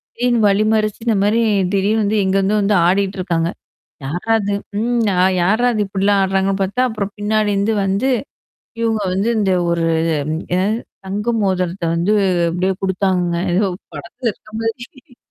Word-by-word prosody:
திடீர்னு 240 -1 +1
வழிமறிச்சு 215 +1 +1
இந்த 225 -3 +2
மாரி 220 +3 +2 0.3
திடீர்ன்னு 210 +3 +1
வந்து, 210 +1 +1
எங்க 190 +1 +1
எங்க 200 +2 +1
வந்து 205 +1 +2
ஆடிட்டு 195 +1 +1
இருக்காங்க. 170 -2 0 0.6
யார்ரா 175 +11 -2
அது? 200 0 -1 0.3
ம் 235 0 +1
ஆ, - - 0 0.2
யார்ரா 220 +7 +2
அது 215 -2 0
இப்டிலாம் 195 +1 +1
ஆடுறாங்கன்னு 195 +1 0
பாத்தா 200 +6 -1
அப்புறம் 205 -2 -4
பின்னாடி 210 0 +1
இருந்து 200 +3 +1
வந்து 200 +7 0 0.7
இவுங்க 225 -2 0
வந்து 200 +5 0
இந்த 195 -3 +1 0.2
ஒரு 170 -1 0 0.2
இ - - +1 0.4
என்னாது 195 +4 +1 0.3
தங்க 205 +4 -3
மோதரத்த 185 -2 -1
வந்து 180 +6 +1 0.4
அப்டியியே 185 +3 0
குடுத்தாங்கங்க. 185 -2 0 0.2
ஏதோ 200 +3 +2 0.3
படத்துல 235 0 -4
இருக்க 215 - -20
மாரி 240 +4 -6
200 Hz, 155 wpm, -18 LUFS, 190-220 Hz, 0.7 s, இந்த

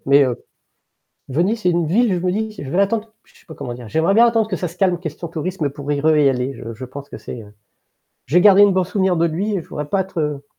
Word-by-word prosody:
mais 140 +1 +6
heu 125 -2 -3 0.8
Venise, 190 - 0
c'est 180 - +3
une 170 -1 0
ville 220 +7 +2
où - - +2
je 185 - -6
me - - +2
dis: 220 +1 -2
«Je 135 - -7
vais 175 - -2
l'attendre» 215 +2 0
j - - -26
je - - -21
sais - - -27
pas 160 - -10
comment 125 -5 -6
dire? 120 -2 -10
J'aimerais 160 - +1
bien 235 +2 +6
attendre 225 -2 +2
que 205 - -2
ça 180 - -3
se 170 - -15
calme, 185 -2 +2
en - - -2
question 170 0 -6
tourisme, 165 -1 -3
pour 140 +1 -7
y 145 - 0
re 155 +1 +3
y 145 -2 +5
aller. 125 +1 -2
Je 115 -2 -8
je 115 - -8
pense 140 +3 -9
que - - -9
c'est, 115 - -8
heu 105 - -15 0.7
j'ai 170 +7 +3
gardé 200 +1 +7
une 205 -1 +6
bon 185 - +2
souvenir 190 0 0
de 170 +1 +2
lui 195 +7 -2
et 185 - -2
je - - -20
voudrais 150 - -4
pas 195 - +1
être, 185 -2 -5
heu 150 -2 -3
170 Hz, 300 wpm, -20 LUFS, 140-195 Hz, 0.8 s, gardé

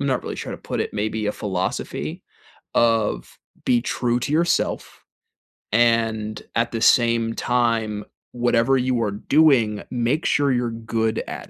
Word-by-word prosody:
I'm 140 - -1
not 130 -2 0
really - - -5
sure - - -5
to - - -7
put - - -4
it, - - -3
maybe 110 +1 -2
a 105 - 0
philosophy 95 -3 -3 0.5
of, 110 - +1 0.3
"Be 120 -1 +3
true 120 0 -1
to 140 - -3
yourself 170 +2 0 0.7
and 115 -1 +1
at 115 0 +1
the 115 -1 -3
same 115 -3 +3
time 115 -4 0 0.3
whatever 120 +1 +2
you 125 -1 0
are 105 - -1
doing, 115 -2 +3
make 125 +6 0
sure 145 -1 +2
you're 120 -2 0
good 115 -1 -2
at - - -7
115 Hz, 150 wpm, -22 LUFS, 110-125 Hz, 0.7 s, Be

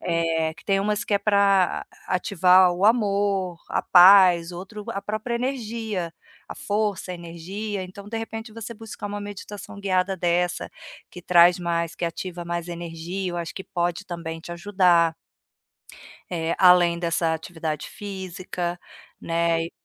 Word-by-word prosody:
eh, 165 -2 0
que - - -17
tem 195 -1 +2
umas 210 +2 0
que 205 - 0
é - - +4
para 200 -2 +2 0.2
ativar 185 0 +4
o 180 +3 -2
amor, 200 -5 +2
a - - -1
paz, 180 -2 +7
outro 195 +4 -8
a 200 -2 -4
própria 215 +3 -3
energia, 225 -8 -3 0.4
a - - -7
força, 205 -2 -2
a - - -3
energia, 185 +4 -6
então 190 +2 -10
de 225 0 -3
repente 225 0 -6
você 230 +1 -7
buscar 215 -1 -8
uma 205 0 -4
meditação 205 0 -8
guiada 190 -1 +1
dessa, 175 0 0 0.4
que 180 - -11
traz 175 0 +6
mais 170 -1 -2
que 175 - -4
ativa 175 +1 -5
mais 170 0 -4
energia, 175 +2 -5
eu - - -4
acho 170 -1 -5
que 190 - -7
pode 175 +2 -2
também 165 -2 -6
te 175 - -8
ajudar 175 -3 +3 1.1
eh, 165 -2 -1
além 180 -2 +6
dessa 170 -1 0
atividade 160 -2 -4
física, 185 -3 -5 0.4
né, 165 0 +1
e - - -9
180 Hz, 150 wpm, -24 LUFS, 170-200 Hz, 1.1 s, paz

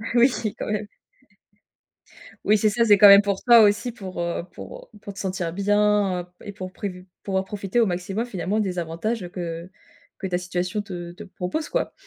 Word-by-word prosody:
Oui, 245 +2 +6 0.3
quand - - -5
même. 210 0 -2 1.6
Oui 215 - +5
c'est 215 +1 +3
ça, 230 +3 +2
c'est 205 -2 +6
quand 205 +1 +9
même 200 0 +10
pour 200 -1 -2
toi 240 -2 +8
aussi 210 +3 +3
pour, 190 -6 -7
heu, 170 0 -2
pour, - - -10
heu, - - -15
pour 200 - -8
te 200 - -10
sentir 185 -3 -3
bien, 205 0 +2
heu, - - -10 0.2
et 205 - -7
pour 185 -1 -7
prévu 185 -2 -7 0.2
pour 195 - -3
en 190 - +2
profiter 200 +3 -1
au - - +4
maximum 190 +4 -2
finalement, 200 -1 -2
des 185 -3 -2
avantages, 175 +7 -3
heu, 175 - -7
que 170 -1 -6 0.5
que 190 - -3
ta 180 -1 0
situation 180 +3 -3
te 175 -4 -7
te 175 - -11
propose, 190 - -4
quoi? - - -1
195 Hz, 205 wpm, -24 LUFS, 180-210 Hz, 1.6 s, même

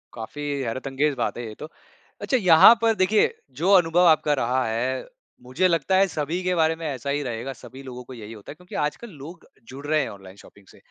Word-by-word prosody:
काफ़ी 115 +6 -8 0.2
हैरतअंगेज 135 +4 -1
बात - - -3
है 120 - -5
ये 105 - -9
तो, 155 - -8 0.5
अच्छा 260 - +1
यहाँ 185 +1 +8
पर 225 -1 +3
देखिए, 205 +3 +2 0.2
जो 165 +9 0
अनुभव 175 -1 +4
आपका 155 -2 +3
रहा 125 +2 0
है 120 +4 -2 0.4
मुझे 160 +9 +1
लगता 170 +1 +1
है 195 0 +4
सभी 155 +3 -3
के 180 0 0
बारे 160 -1 +2
में - - -5
ऐसा 140 -1 -5
ही 145 +1 -1
रहेगा, 120 +2 -5
सभी 135 +1 -11
लोगों 125 -1 -9
को - - -8
यही 110 -2 -9
होता 105 -3 -11
है - - -10
क्योंकि 180 +3 -13
आजकल 180 +10 -4
लोग 165 +4 -11 0.3
जुड़ 140 +2 -9
रहे 155 0 +2
हैं - - -3
ऑनलाइन 95 -1 -12
शॉपिंग 100 -2 -19
से। - - -19
145 Hz, 220 wpm, -24 LUFS, 125-175 Hz, 0.5 s, यहाँ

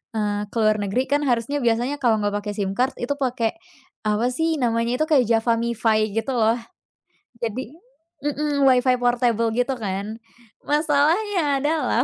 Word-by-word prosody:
eee, 205 -1 -1
ke - - -19
luar 215 0 +3
negeri 200 +6 0
kan 285 +2 +1
harusnya 245 +4 0
biasanya 240 +4 +1
kalau 230 -4 +3
enggak 205 0 0
pakai 210 0 -4
SIM 195 -2 -1
card 255 +3 +1
itu 240 - -3
pakai 250 -3 -1 0.5
apa 215 +3 +1
sih, 320 +4 0
namanya 235 0 0
itu 310 - +2
kayak 285 -6 +4
JavaMifi 225 -2 +1
gitu 225 +4 -1
loh. 225 -1 +3 0.9
Jadi 235 +1 -3 0.6
mhm, 295 -1 0
Wi-Fi 255 0 +4
portable 240 -2 +2
gitu 245 +2 +1
kan? 205 0 -4 0.5
Masalahnya 300 +1 +1
adalah 310 +2 +1
240 Hz, 150 wpm, -23 LUFS, 220-280 Hz, 0.9 s, kayak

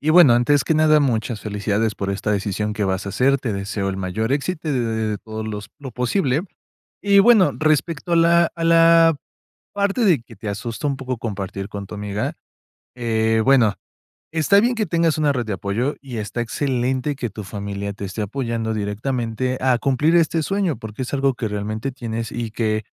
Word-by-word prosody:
Y, 155 - +1
bueno, 160 -7 +7
antes 135 +4 +3
que 160 - +1
nada, 155 -1 +5
muchas 115 -5 -1
felicidades 105 +1 -1
por 100 0 -3
esta 100 +2 -2
decisión 105 +1 -1
que 105 - -1
vas 95 +1 -1
a - - -2
hacer. 135 +7 +2
Te 125 -4 -3
deseo 100 0 -3
el 95 - -3
mayor 95 +6 -2
éxito 155 +3 -2
y - - +1
de 130 - +1 0.3
de 105 -2 -2
todo 110 0 -7
los 105 -1 -6
lo 140 -3 -8
posible 130 - 0 0.6
y, 200 -1 +5
bueno, 215 -2 +5
respecto 155 +2 0
a - - +4
la 170 0 +4
a 165 - -4
la 165 -1 +6 0.6
parte 200 +3 0
de 170 - +4
que - - -15
te 110 - -6
asusta 115 +7 -4
un 140 - 0
poco 130 -2 -4
compartir 100 -3 -5
con 100 -1 -7
tu - - -9
amiga, 105 0 -3 0.6
eh, 110 -2 +1
bueno. 125 -6 +4 0.6
Está 165 +5 +4
bien 240 +4 +2
que 220 -2 0
tengas 165 -3 +1
una 150 -2 +2
red 125 -3 -2
de 110 - -3
apoyo 105 +9 -2
y 130 -5 -7
está 110 +3 -3
excelente 130 +3 -1
que 120 -4 -4
tu 105 -1 -8
familia 100 0 -5
te 100 - -9
esté 100 +3 -4
apoyando 115 -1 -2
directamente 115 +4 -2
a 130 -2 +3
cumplir 145 +6 +2
este 165 -1 +2
sueño, 195 -3 0
porque 110 +2 -6
es 125 - -7
algo 135 -1 +2
que 120 -2 -3
realmente 110 +5 -3
tienes 115 -3 -5
y 120 -2 -4
que 110 -1 -1
120 Hz, 200 wpm, -21 LUFS, 105-150 Hz, 0.6 s, bueno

